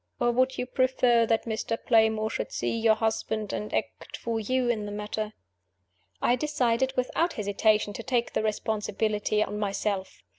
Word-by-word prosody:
Or 240 0 +3
would 255 +2 +1
you 250 - -1
prefer 250 -2 +3
that 225 0 +1
Mr. 225 0 -2
Playmore 220 -1 +3
should - - -3
see - - -1
your 225 -1 +4
husband, 220 -1 -1
and 210 - -4
act - - -3
for 230 -1 -2
you 255 +3 0
in 215 -3 0
the - - -5
matter?" 210 +1 -4 0.9
I 245 - +4
decided, 260 -3 +1
without 330 +7 +1
hesitation, 210 0 +1
to - - -6
take 245 -3 -1
the - - +1
responsibility 215 -1 0
on 210 - -5
myself. 200 -1 -2
220 Hz, 160 wpm, -27 LUFS, 210-240 Hz, 0.9 s, your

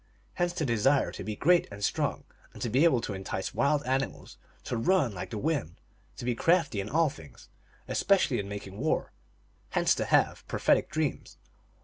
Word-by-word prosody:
Hence 175 -1 0
the 160 - -2
desire 130 +3 +2
to - - -7
be 105 +1 -4
great 175 +9 +3
and 100 0 -8
strong, - - -1 0.4
to 120 - -2
be 135 +8 +4
able 130 -8 +4
to 110 - -4
entice 95 0 -4
wild 145 +1 +2
animals, 130 -3 -3 0.2
to - - -3
run 135 - +2
like 90 - -6
the 110 - -5
wind, 135 - -1 0.4
to - - -6
be 125 - +1
crafty 155 - +2
in 100 - -6
all 160 -1 +2
things, 80 - -14 0.4
especially 185 -10 +2
in 100 -1 -4
making 100 -1 -7
war; 155 +4 0 0.6
hence - - +2
to - - -2
have - - +2
pro - - -3
phetic - - +3
dreams. 155 -2 -3
130 Hz, 185 wpm, -29 LUFS, 105-155 Hz, 0.6 s, be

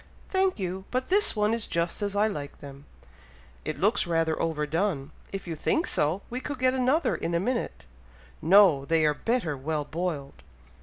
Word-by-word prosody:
"Thank 380 -1 +1
you! 190 -1 -4
but 255 +1 -2
this 405 - +4
one 210 +1 +2
is 230 -2 -2
just 170 +4 -1
as 205 -1 -2
I 205 +1 +3
like 145 -10 -4
them." 140 0 -11 0.8
"It - - -4
looks - - +2
rather 165 -1 +1
over 160 -2 -1
done! 160 -3 -1 0.2
If 195 0 -5
you 170 - -4
think 315 - 0
so, 160 +7 0
we 250 - -4
could 285 +1 -5
get 255 0 +2
another 265 +5 +2
in 170 - -2
a - - +3
minute!" 235 - -2 0.6
"No! 175 -4 +6
they 160 +2 +2
are 150 - +3
better 225 - -1
well 150 +2 -2
boiled!" 155 - -4
175 Hz, 185 wpm, -27 LUFS, 155-230 Hz, 0.8 s, No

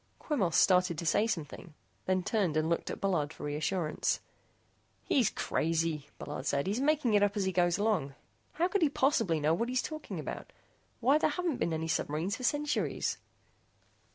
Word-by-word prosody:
Quemos 200 - -1
started 180 -3 +4
to 170 - -4
say 205 +7 +3
something, 160 -3 -5 0.3
then 185 -1 +1
turned 185 -7 0
and 155 0 +1
looked 170 0 -1
at - - -5
Bullard 170 -7 0
for 160 - -11
reassurance. 155 +3 -1 0.8
"He's 245 -7 +2
crazy," 160 -2 -1
Bullard 145 - -6
said, 140 0 +1
"he's 210 +6 -1
making 290 -5 +2
it 205 - +5
up 205 +1 +2
as 200 - +1
he 190 - +1
goes 175 -1 +2
along. 200 -11 0 0.4
How 340 +3 +1
could 390 +1 0
he 315 - +4
possibly 245 - +2
know 150 +2 +2
what 230 +8 -1
he's 255 0 0
talking 310 0 -6
about? - - -6 0.5
Why, 275 +6 +4
there - - +2
haven't 335 -2 -1
been 170 - -1
any 160 0 -2
submarines 165 +5 -1
for 255 - -9
centuries." 295 +3 0
190 Hz, 180 wpm, -31 LUFS, 160-250 Hz, 0.8 s, it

